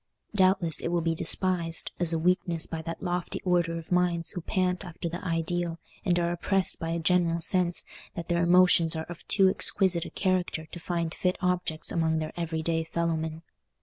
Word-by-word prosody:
Doubtless 185 Hz, -4 st, +2 dB
it -, -, -3 dB
will 170 Hz, 0 st, 0 dB
be 165 Hz, 0 st, 0 dB
despised 170 Hz, 0 st, +2 dB
as 175 Hz, -2 st, +2 dB
a 165 Hz, -, 0 dB
weakness 170 Hz, -1 st, +1 dB
by 165 Hz, -1 st, -5 dB
that 165 Hz, +1 st, -7 dB
lofty 175 Hz, -1 st, -2 dB
order 175 Hz, -2 st, +1 dB
of 165 Hz, +1 st, -10 dB
minds 175 Hz, -2 st, +1 dB
who 175 Hz, -, -5 dB
pant 185 Hz, +2 st, -1 dB
after 175 Hz, -2 st, -6 dB
the 170 Hz, +2 st, -6 dB
ideal, 170 Hz, 0 st, -2 dB, 0.3 s
and 180 Hz, -4 st, +1 dB
are 170 Hz, 0 st, 0 dB
oppressed 190 Hz, +2 st, 0 dB
by 165 Hz, -, -4 dB
a 165 Hz, -, -1 dB
general 170 Hz, 0 st, +2 dB
sense 175 Hz, 0 st, +2 dB, 0.3 s
that 170 Hz, -1 st, -6 dB
their 170 Hz, -1 st, +1 dB
emotions 175 Hz, -2 st, +4 dB
are 160 Hz, 0 st, -3 dB
of 175 Hz, -, -10 dB
too 195 Hz, -2 st, +4 dB
exquisite 185 Hz, -2 st, +3 dB
a -, -, -7 dB
character 185 Hz, -4 st, -1 dB
to 175 Hz, -, -10 dB
find 170 Hz, -1 st, -2 dB
fit 180 Hz, 0 st, -1 dB
objects 180 Hz, -3 st, -1 dB
among 160 Hz, -1 st, +1 dB
their 155 Hz, 0 st, -4 dB
everyday 165 Hz, -1 st, -2 dB
fellowmen. 160 Hz, -1 st, -2 dB
170 Hz, 185 wpm, -27 LUFS, 165-180 Hz, 0.3 s, emotions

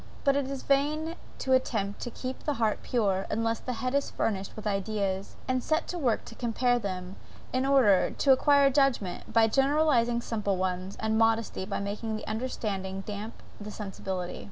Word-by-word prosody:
But 275 Hz, -1 st, +4 dB
it 280 Hz, -1 st, 0 dB
is 275 Hz, -1 st, -5 dB
vain 305 Hz, +4 st, +1 dB, 0.2 s
to 260 Hz, -, 0 dB
attempt 210 Hz, -6 st, 0 dB
to 245 Hz, -, -3 dB
keep 255 Hz, +2 st, -5 dB
the 295 Hz, -, -2 dB
heart 220 Hz, -3 st, 0 dB
pure, 195 Hz, -6 st, 0 dB
unless 225 Hz, +1 st, 0 dB
the 255 Hz, -, -4 dB
head 255 Hz, -, 0 dB
is 280 Hz, 0 st, +1 dB
furnished 195 Hz, -3 st, -2 dB
with 215 Hz, -, -8 dB
ideas, 195 Hz, -1 st, -1 dB
and 255 Hz, -1 st, +1 dB
set 315 Hz, +6 st, 0 dB
to 355 Hz, -, -3 dB
work 245 Hz, -7 st, +1 dB
to -, -, -10 dB
compare 245 Hz, +1 st, +1 dB
them, 185 Hz, -3 st, -5 dB, 0.4 s
in 260 Hz, +1 st, +1 dB
order, 245 Hz, -9 st, +5 dB
to 275 Hz, -, +2 dB
acquire 280 Hz, +1 st, +5 dB
judgment, 265 Hz, -9 st, +1 dB
by 225 Hz, 0 st, +5 dB
generalizing 270 Hz, -1 st, +3 dB
simple 210 Hz, -5 st, -1 dB
ones; 185 Hz, +1 st, -2 dB
and 220 Hz, 0 st, +1 dB
modesty 225 Hz, -3 st, +1 dB
by 200 Hz, -, -3 dB
making 210 Hz, +2 st, -3 dB
the 215 Hz, -, -7 dB
understanding 205 Hz, -4 st, -3 dB
damp 210 Hz, +2 st, -7 dB, 0.2 s
the 210 Hz, 0 st, -7 dB
sensibility. 190 Hz, -3 st, -5 dB
225 Hz, 180 wpm, -29 LUFS, 200-260 Hz, 0.4 s, order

